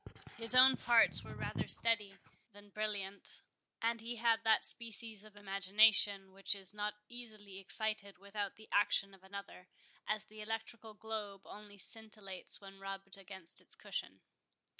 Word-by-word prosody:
His 230 +1 +5
own 260 +1 +8
parts 235 -1 +6
were - - -10
rather - - -4
steady 210 -4 +1 0.4
than 205 0 -16
brilliant; 200 -2 -4 0.4
and 230 0 0
he 235 +2 -5
had 230 -1 +2
that 220 -1 +3
species 225 -2 -2
of 215 -1 -16
imagination 195 0 +3
which 195 +1 -2
is 195 -1 -2
not 210 0 -3
easily 215 -5 -10
excited 205 +1 +2
without 200 +1 -5
the 220 - -15
action 195 -1 +2
of 190 -1 -18
another, 195 -1 -10 0.4
as 215 0 -2
the 215 0 -12
electrical 225 0 -6
globe 210 -2 -6
only 205 -1 -12
scintillates 210 -2 -3
when 195 -1 -13
rubbed 195 0 -6
against 190 -3 -2
its - - -12
cushion. - - -6
205 Hz, 145 wpm, -35 LUFS, 195-220 Hz, 0.4 s, own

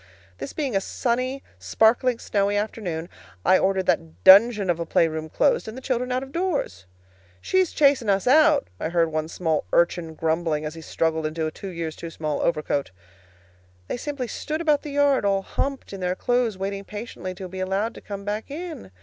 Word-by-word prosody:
This 135 - -5
being 275 -8 -2
a 195 - +2
sunny, 255 +5 -2 0.2
sparkling, 235 +2 +3
snowy 205 -2 0
afternoon, 190 -6 -3 0.4
I 185 - +6
ordered 190 -1 +1
that 80 +2 -1
dungeon 205 - +7
of 170 - -3
a 170 - -2
playroom 160 -1 +1
closed 175 - +2
and 220 +3 -7
the - - -7
children 250 -1 -1
out 255 +1 0
of 270 - -10
doors. 285 - -2 0.5
"She's 375 - +1
chasin' 275 -7 +3
us 195 -1 +2
out," 300 +3 +5
I - - -2
heard 165 -1 +1
one 155 0 -1
small 160 -2 -1
urchin 170 -1 +1
grumbling 160 -1 0
as 150 - -4
he 165 - -9
struggled 160 0 -1
into 160 +1 -3
a 155 - -2
two 195 - -8
years 165 -3 -4
too 170 - -7
small 155 -2 -3
overcoat. 150 -4 0 1.0
They - - -3
simply 275 -1 -4
stood 310 +7 -4
about 300 -3 +2
the 300 - -7
yard, 285 -3 +3
all 195 -1 +1
humped 275 -1 -3
in 195 - -6
their 180 0 -1
clothes, 245 -2 0
waiting 195 +1 -3
patiently 205 -3 -7
to 185 +1 -7
be 185 +1 -8
allowed 195 +5 -1
to - - -11
come 200 -1 -7
back 210 +4 -3
in. 320 - -7
195 Hz, 190 wpm, -24 LUFS, 165-255 Hz, 1.0 s, dungeon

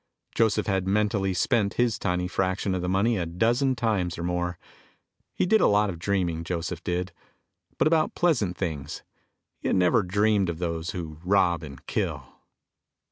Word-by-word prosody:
Joseph 110 -2 +2
had 95 -3 0
mentally 100 -1 +1
spent 100 +2 +1
his 120 -3 +1
tiny 90 -2 -1
fraction 95 +1 -1
of 90 - -1
the 90 - -2
money 100 +5 +2
a 85 -3 -2
dozen 120 +10 +1
times 105 -7 -1
or 85 - -5
more. 90 0 -2 0.8
He - - +1
did 220 +4 +4
a - - +5
lot 105 0 +3
of 85 - -9
dreaming, 90 -3 -1
Joseph 85 -1 -4
did. 90 +1 -2 0.7
But - - +2
about 155 0 +2
pleasant 120 - +1
things. 75 -6 -4 0.6
He - - -4
had - - +2
never 90 +3 +4
dreamed 100 0 +2
of 85 - -3
those 85 -1 -3
who 80 -4 -6
rob 90 -3 +2
and 70 -4 -10
kill. - - -2
95 Hz, 170 wpm, -26 LUFS, 85-105 Hz, 0.8 s, a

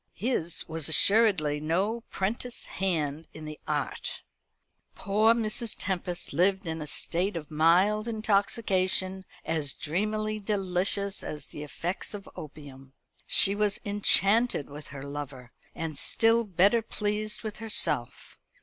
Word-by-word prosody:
His 185 -7 -2
was 160 -1 0
assuredly 185 -6 +4
no 190 +9 -1
'prentice 235 +5 -3
hand 160 -5 -3
in 155 - -9
the 155 0 -8
art. 145 -2 -3 0.7
Poor 215 +3 +2
Mrs. 225 0 -2
Tempest 180 -4 -3
lived 190 +5 +1
in 160 -1 -4
a 150 - -6
state 175 +6 0
of 155 -1 -9
mild 185 +8 +3
intoxication, 195 -3 +1 0.2
as 150 -4 -1
dreamily 215 +6 -2
delicious 195 0 0
as 150 - -5
the - - -10
effects 175 +7 -5
of 200 - -10
opium. 135 -3 -11 0.3
She 195 - +6
was 205 0 +1
enchanted 205 - +4
with 145 0 -10
her 135 0 -9
lover, 140 -4 -8 0.2
and 160 -2 -5
still 230 +1 +2
better 200 +4 +3
pleased 210 0 -3
with 215 -2 -6
herself. 205 - 0
190 Hz, 125 wpm, -27 LUFS, 155-210 Hz, 0.7 s, She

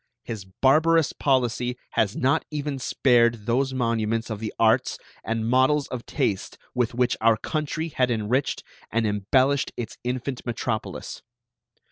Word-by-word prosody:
His 110 -5 -6
barbarous 155 - +3
policy 125 -2 0
has 105 -2 +1
not 130 +2 +2
even 145 -2 -3
spared 120 -4 +2
those 130 +3 +1
monuments 115 -2 -1
of 105 - -4
the 110 -1 -4
arts 110 -1 +3 0.3
and 115 0 -2
models 130 +4 +3
of 125 -2 -6
taste 95 - -1 0.2
with 120 -1 0
which 125 0 +2
our 115 0 +4
country 155 +3 -3
had 130 -4 +1
enriched 120 +4 0 0.3
and 115 0 +1
embellished 130 +7 +2
its 115 -2 -6
infant 125 +1 -3
metropolis. 115 -2 -4
120 Hz, 135 wpm, -25 LUFS, 115-135 Hz, 0.3 s, our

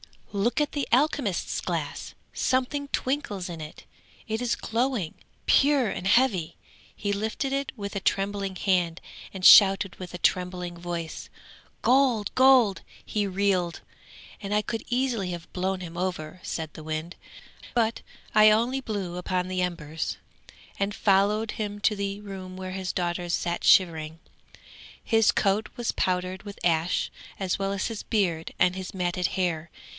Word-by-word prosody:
'Look 215 +8 +1
at 295 - 0
the 285 -2 -2
alchemist's 260 - +1
glass! - - -4 0.2
something 260 +3 0
twinkles 250 -10 -2
in 170 -2 -6
it; 155 0 -9 0.4
it 220 +1 -2
is 245 -1 +1
glowing, 230 -7 -1 0.3
pure 280 -5 +4
and 190 - -3
heavy. 195 -8 +3 0.4
He 205 - -2
lifted 220 +6 -2
it 275 0 -1
with 200 -2 -6
a - - 0
trembling 195 0 -1
hand 180 -3 +1 0.3
and 190 -1 -7
shouted 195 -1 +8
with 180 -1 -8
a - - -4
trembling 180 -1 -1
voice: 170 -2 -5 0.5
"Gold! 250 -5 +3
gold!" 255 -6 +5 0.2
He 210 -2 -1
reeled, 190 -3 0 0.6
and 205 0 -2
I 210 - +3
could 225 0 -4
easily 240 -7 0
have 170 -1 -7
blown 185 +1 -1
him 170 -1 -8
over,' 180 -2 -3
said 160 -2 -4
the 155 - -10
wind, 155 +2 -4 0.6
'but 230 -1 +1 0.3
I 215 0 +8
only 235 +5 +2
blew 200 -8 -4
upon 180 0 -1
the 185 0 -1
embers, 160 -3 -3 0.6
and 200 +1 -1
followed 210 +2 +2
him 205 -1 -4
to 210 - +3
the 200 0 -3
room 190 -2 -8
where 185 0 -5
his 190 -1 -3
daughters 175 -1 -2
sat 170 0 -1
shivering. 160 -3 +4 0.8
His 225 -2 +4
coat 205 +1 +1
was 240 -1 -1
powdered 185 0 -1
with 205 -1 -9
ash, 165 0 +1 0.3
as 190 -1 -1
well 195 0 -1
as 195 - -1
his 225 -3 -5
beard 175 -7 -1
and 180 0 +3
his 185 -1 -6
matted 180 -1 0
hair. 170 -3 -1
195 Hz, 150 wpm, -26 LUFS, 180-220 Hz, 0.8 s, shouted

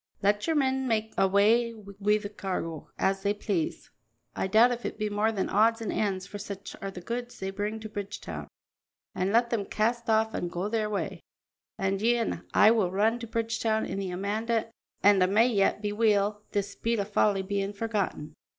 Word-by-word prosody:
"Let 205 +4 +2
your 325 - +2
men 265 -2 +1
make 220 -2 0
awa' 215 +5 +3
wi' 205 0 0
the 210 -1 -5
cargo 165 -6 -4
as 195 0 +1
they 205 +1 0
please 195 -6 -2 0.4
I - - -1
doubt 225 +5 +5
if 240 0 -3
it - - -4
be 215 -1 -2
more 210 +2 +2
than 200 -4 -1
odds 225 +3 +3
an' 225 - -3
ends, 190 -3 -1
for 205 - -8
such 200 -1 -7
are 195 - -3
the 185 -2 -8
goods 240 +4 -5
they 190 0 -4
bring 210 +3 -3
to 220 - -6
Bridgetown 205 -1 -6 0.7
an' 185 +2 0
let 235 +2 +3
them 225 -4 0
cast 230 +4 -1
off 220 0 +3
an' 175 - -2
go 175 +3 -3
their 215 -1 0
way, 205 -2 -3 0.6
an' 195 -1 0
ye 235 +3 +3
an' 230 - -2
I 215 - +6
will 215 -6 +2
return 215 +5 +1
to 230 - -6
Bridgetown 225 -1 0
in - - -4
the 195 -1 -3
Amanda 220 +5 -1 0.3
an' 200 -2 +6
a' 185 - +5
may 215 +5 +4
yet 205 -1 +1
be 205 - 0
weel, 210 -1 +2
this 200 0 -1
bit 230 -1 -1
o' - - +1
folly 200 -1 +1
bein' 200 0 -2
forgotten." 200 -8 -3
210 Hz, 200 wpm, -28 LUFS, 195-225 Hz, 0.7 s, I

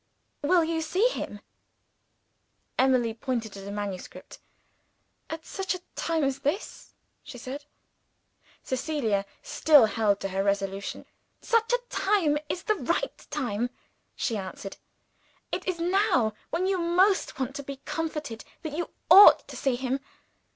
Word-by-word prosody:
"Will 340 +4 +4
you 325 0 -1
see 365 +9 +2
him?" 205 - -5 1.4
Emily 255 -3 +3
pointed 230 -2 -3
to 195 - -8
the 195 - -8
manuscript. 200 -3 -6 0.9
"At 320 0 -6
such 385 -1 -2
a 365 - -8
time 325 -2 0
as 275 -1 0
this?" 330 +10 -3 0.3
she 290 -4 -10
said. 270 +4 -7 1.0
Cecilia 255 -7 -1 0.2
still 305 - +6
held 210 -1 +1
to 195 - -2
her 195 +1 -1
resolution. 195 0 -2 0.3
"Such 460 -1 +1
a - - +4
time 380 -7 +2
as - - -5
this - - -1
is - - -22
the 430 - +2
right 340 - -2
time," 245 -5 -1 0.5
she 225 - -1
answered. 195 0 -7 0.7
"It - - -3
is 365 -2 0
now, 340 - +2 0.2
when 345 +3 0
you 380 -1 +1
most 365 +4 +2
want 265 +1 -2
to - - -4
be 275 0 -7
comforted, 300 -8 -4 0.2
that 315 -3 -4
you 345 +1 -2 0.2
ought 395 +3 +10
to - - -8
see 270 -3 0
him. 260 +2 -1
280 Hz, 145 wpm, -27 LUFS, 225-340 Hz, 1.4 s, ought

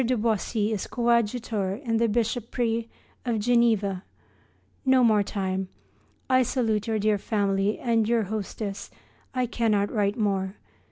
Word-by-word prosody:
de 250 +1 +1
Boisy 220 0 0
is 210 -3 -2
coadjutor 235 -4 0
in 230 -3 0
the 230 0 +2
bishopric 230 +1 -1 0.3
of 235 -3 0
Geneva. 215 -4 +2 0.8
No 260 -1 +4
more 215 -3 +5
time. 190 -2 -2 0.6
I 255 0 +4
salute 225 -4 0
your 220 -1 0
dear 210 -1 +1
family 200 -1 0
and 230 -3 +1
your 235 -2 +3
hostess. 200 0 -5 0.5
I 255 0 +1
cannot 220 -4 +1
write 205 0 0
more. 195 -3 0
220 Hz, 130 wpm, -26 LUFS, 205-235 Hz, 0.8 s, more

